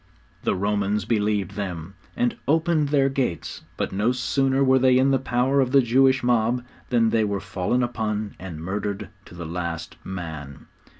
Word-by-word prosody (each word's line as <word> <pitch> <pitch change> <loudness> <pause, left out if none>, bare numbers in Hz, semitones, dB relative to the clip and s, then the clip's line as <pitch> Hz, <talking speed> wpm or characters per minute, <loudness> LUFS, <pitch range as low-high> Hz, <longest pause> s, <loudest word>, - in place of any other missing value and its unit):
The - - 0
Romans 100 +1 0
believed 105 -4 0
them, 95 -4 -5 0.2
and 120 0 +1
opened 160 0 +2
their 140 -2 +3
gates; 135 - -2 0.2
but - - -2
no 105 +5 +1
sooner 135 +1 +1
were 130 0 +4
they 130 0 +5
in 135 +1 +4
the 135 - +3
power 130 +2 +1
of 130 0 -1
the 140 - +7
Jewish 130 +2 +3
mob 120 0 +2 0.3
than 115 -2 +3
they 115 -1 +3
were 100 -1 -1
fallen 100 +6 -1
upon 110 -3 -2
and 90 -4 -7
murdered 100 +2 -3 0.2
to - - -13
the 85 -1 -6
last 85 -1 -5
man! 80 -7 -7
110 Hz, 170 wpm, -24 LUFS, 95-130 Hz, 0.3 s, the